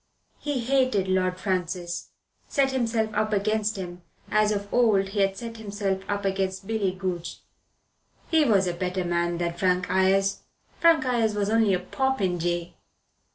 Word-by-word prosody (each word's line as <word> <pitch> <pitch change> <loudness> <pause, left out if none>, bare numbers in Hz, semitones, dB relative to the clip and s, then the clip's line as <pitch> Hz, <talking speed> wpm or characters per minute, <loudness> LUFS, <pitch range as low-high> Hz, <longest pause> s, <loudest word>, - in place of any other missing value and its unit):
He 290 -4 -2
hated 255 -6 +2
Lord 185 -1 +1
Francis, 180 -2 -2 0.4
set 275 -2 +1
himself 225 -4 0
up 215 +1 0
against 215 +1 +1
him, 180 -2 -7 0.3
as 215 0 +3
of 200 -1 -2
old 210 -5 +3
he 205 +1 -3
had 195 0 +2
set 230 +2 -7
himself 200 -3 -2
up 205 0 -1
against 190 0 -1
Billy 210 -3 0
Goodge. 185 -2 -5 0.8
He 320 -2 +4
was 205 -8 +3
a 175 - -1
better 180 +1 -2
man 175 0 0
than 170 0 -1
Frank 180 0 0
Ayres. 195 +1 +2 0.4
Frank 330 -5 +5
Ayres 230 -4 +1
was 205 0 0
only 220 -4 +4
a - - -1
popinjay. 180 -7 -1
195 Hz, 155 wpm, -26 LUFS, 185-220 Hz, 0.8 s, Frank